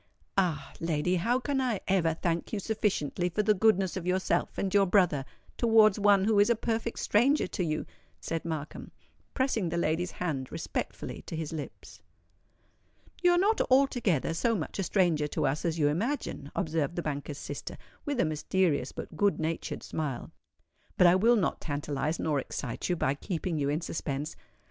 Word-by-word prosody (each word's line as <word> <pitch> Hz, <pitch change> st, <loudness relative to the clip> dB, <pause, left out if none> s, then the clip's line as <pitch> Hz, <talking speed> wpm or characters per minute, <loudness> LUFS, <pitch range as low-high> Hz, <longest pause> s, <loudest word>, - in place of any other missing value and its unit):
"Ah! 160 Hz, -8 st, 0 dB
lady, 165 Hz, +2 st, 0 dB
how 235 Hz, +9 st, +1 dB
can 270 Hz, +1 st, -1 dB
I 240 Hz, -6 st, 0 dB
ever 170 Hz, -4 st, +2 dB
thank 170 Hz, 0 st, -2 dB
you 215 Hz, -, -1 dB
sufficiently 190 Hz, -6 st, -1 dB
for 210 Hz, +5 st, 0 dB
the 215 Hz, 0 st, +4 dB
goodness 195 Hz, -3 st, +2 dB
of 180 Hz, -2 st, -4 dB
yourself 185 Hz, +1 st, 0 dB
and 195 Hz, -1 st, -1 dB
your 200 Hz, -1 st, +5 dB
brother 180 Hz, -8 st, +3 dB, 0.3 s
towards 220 Hz, -3 st, +5 dB
one 200 Hz, -1 st, +5 dB
who 210 Hz, 0 st, +3 dB
is 205 Hz, -, +5 dB
a 235 Hz, -, +4 dB
perfect 230 Hz, +1 st, -2 dB
stranger 265 Hz, +8 st, +3 dB
to 180 Hz, -, -3 dB
you?" 155 Hz, -2 st, -2 dB, 0.3 s
said 165 Hz, -1 st, -3 dB
Markham, 155 Hz, -3 st, -5 dB, 0.5 s
pressing 245 Hz, -9 st, +1 dB
the 170 Hz, -, -2 dB
lady's 170 Hz, +2 st, 0 dB
hand 145 Hz, -7 st, -3 dB
respectfully -, -, -4 dB
to -, -, -5 dB
his 160 Hz, -1 st, -4 dB
lips. 150 Hz, -3 st, -8 dB, 1.2 s
"You 355 Hz, -1 st, +5 dB
are -, -, +3 dB
not 410 Hz, +5 st, +3 dB
altogether 245 Hz, -, +2 dB
so 230 Hz, +8 st, +1 dB
much 180 Hz, +1 st, -4 dB
a -, -, +1 dB
stranger 170 Hz, -6 st, +2 dB
to -, -, -1 dB
us 140 Hz, +5 st, -1 dB
as 165 Hz, -1 st, 0 dB
you 150 Hz, -3 st, +3 dB
imagine," 170 Hz, -, -2 dB
observed 160 Hz, -4 st, -1 dB
the 175 Hz, -, -2 dB
banker's 145 Hz, -1 st, -4 dB
sister, -, -, -6 dB, 0.3 s
with 285 Hz, -4 st, -2 dB
a -, -, +4 dB
mysterious 155 Hz, -2 st, 0 dB
but -, -, -8 dB
good 200 Hz, +5 st, +2 dB
natured 160 Hz, +1 st, -3 dB
smile. 145 Hz, -6 st, -4 dB, 0.7 s
"But 180 Hz, -, +6 dB
I 175 Hz, -, +7 dB
will 225 Hz, +6 st, +5 dB
not 200 Hz, -7 st, 0 dB
tantalize, 145 Hz, +1 st, -2 dB
nor 150 Hz, -3 st, 0 dB
excite 130 Hz, +1 st, -4 dB
you 180 Hz, -, +2 dB
by 135 Hz, -5 st, +1 dB
keeping 165 Hz, +2 st, -3 dB
you 140 Hz, -1 st, 0 dB
in 150 Hz, +3 st, 0 dB
suspense. 145 Hz, -3 st, -4 dB
175 Hz, 175 wpm, -29 LUFS, 155-210 Hz, 1.2 s, I